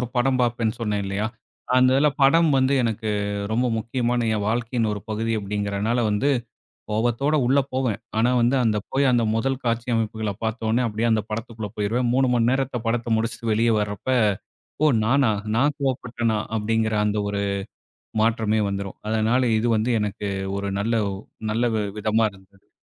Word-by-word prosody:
ஒரு 125 - -2
படம் 130 +1 +2
பார்ப்பேன்னு 120 -1 0
சொன்னேன் 105 -2 -1
இல்லையா? 100 +2 -2 0.5
அந்த 130 0 +5
இதுல 150 +2 +4
படம் 165 +4 +5
வந்து 130 +1 +3
எனக்கு 110 -1 -2 0.4
ரொம்ப 125 +3 +1
முக்கியமான 120 0 -1
என் 105 -1 -1
வாழ்க்கையின் 115 0 0
ஒரு 105 - -4
பகுதி 110 +1 -1
அப்படிங்கறனால 100 +3 -1
வந்து, 120 +8 +1 0.6
கோவத்தோட 120 +7 +1
உள்ள 135 +3 +4
போவேன். 125 -5 0 0.2
ஆனா 120 +3 +3
வந்து, 120 +3 +3
அந்த 110 -2 +2
போய் 135 0 +3
அந்த 120 -1 +3
மொதல் 135 +3 -1
காட்சி 115 +1 -1
அமைப்புகள 110 -2 -2
பார்த்த 110 0 -2
ஒன்னே 120 +3 +2
அப்படியே 110 +2 -1
அந்த 110 -1 +2
படத்துக்குள்ள 110 -1 -5
போயிருவேன். 120 +4 0
3 130 -1 +3
மணி 120 0 +3
நேரத்த 135 -2 -1
படத்த 115 0 0
முடிச்சுட்டு 115 0 -2
வெளிய 115 +2 +2
வர்றப்ப, 105 +4 -4 0.8
"ஓ! - - +6 0.2
நானா? 130 -1 +3 0.3
நா 135 - +4 0.2
கோவப்பட்டனா" 120 -4 -1 0.2
அப்படீங்கிற 110 0 0
அந்த 105 0 0
ஒரு 100 0 -2 0.8
மாற்றமே 110 -1 +2
வந்துரும். 100 -1 -5
அதனால 110 +3 +2 0.2
இது 115 +2 0
வந்து 110 +3 0
எனக்கு 105 0 -3 0.3
ஒரு 100 0 -3
நல்ல 115 +3 0
வ் 95 -1 -4 0.3
நல்ல 115 +2 +1 0.3
விதமா 110 +1 +2
இருந்தது. 95 0 -21
115 Hz, 160 wpm, -23 LUFS, 105-125 Hz, 0.8 s, ஓ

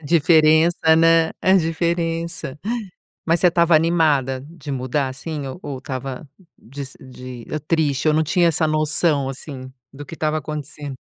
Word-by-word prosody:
a - - -18
diferença, 160 +1 +4
né, 165 0 +4
a 185 - +4
diferença. 165 -3 -1 0.7
Mas 165 0 +2
você 180 - +5
estava 170 -1 +3
animada 155 -6 +2
de 150 -4 -9
mudar, 130 +2 -1
assim, 145 +2 -6
ou 130 - -8
ou 140 -2 -5
estava 130 +2 -6 0.3
de 140 +3 -8
se 130 - -11
de, 125 -2 -10
hã, 155 - -2
triste, 155 -4 +1
ou 155 - +4
não 155 - +2
tinha 175 +2 +2
essa 160 -1 +1
noção, 155 -2 +1
assim, 130 -1 -7 0.2
do 145 +1 -9
que 155 - -11
estava 155 -1 -1
acontecendo? 150 -2 -6
155 Hz, 160 wpm, -21 LUFS, 135-165 Hz, 0.7 s, você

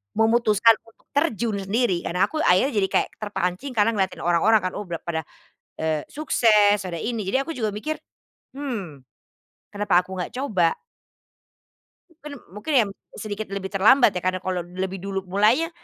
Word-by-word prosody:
memutuskan 225 0 +4 0.2
untuk 225 - -29
terjun 240 - 0
sendiri 195 -1 0
karena 180 +2 +1
aku 310 - -5
akhirnya 190 +5 +3
jadi 195 - +2
kayak - - +1
terpancing 205 +4 -3
karena 210 +2 +4
ngelihatin 190 -3 -2
orang-orang 175 +6 +4
kan 185 - -1
oh - - -4
bla 170 -1 -3
pada, 160 -2 -2 0.6
eee, 155 -2 -1
sukses, 215 -8 +4
ada 175 - -5
ini, 225 -3 -3
jadi 260 +8 +1
aku 330 - -6
juga 215 -4 -1
mikir, 310 +9 -3 0.6
"Hmm, 225 - -5 0.7
kenapa 205 -3 +2
aku 185 +1 -9
nggak 180 - -4
coba?" 185 -11 +1 1.4
Mungkin 300 -2 -10 0.2
mungkin 210 +10 -4
ya 215 -4 +2 0.3
sedikit 215 0 -5
lebih 195 -1 -4
terlambat 220 +6 +5
ya, 180 - -3
karena 185 0 -1
kalau 185 -2 -2
lebih 185 +2 -5
dulu 195 0 -3
mulainya, 215 - +2
205 Hz, 160 wpm, -23 LUFS, 185-230 Hz, 1.4 s, terlambat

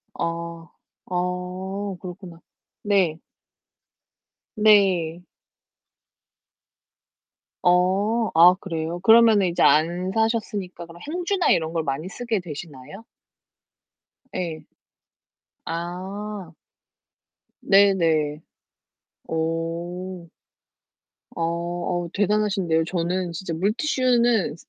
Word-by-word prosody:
어 170 -1 -4 0.4
어 180 +2 -3
그렇구나. 180 -2 -9 0.4
네. 190 -6 +2 1.4
네. 190 -6 +3 2.4
어. 195 +6 +2
아 175 +2 +8
그래요? 165 -2 -4
그러면은 220 -2 +6
이제 170 - -2
안 175 +4 +3
사셨으니까 215 -6 -2
그럼 170 +1 -14
행주나 355 +4 0
이런 160 -1 +1
걸 165 -1 -1
많이 145 +4 -3
쓰게 230 0 -2
되시나요? 160 - -9 1.3
예. 170 -4 -4 1.0
아. 185 +3 -5 1.1
네네. 165 -7 +3 0.9
어. 170 +2 -3 1.1
어 170 +1 -2 0.3
어 - - -8
대단하신데요. 200 -5 +1
저는 175 +1 -2
진짜 170 0 -5
물티슈는 235 - +1
180 Hz, 150 characters per minute, -23 LUFS, 165-205 Hz, 2.4 s, 아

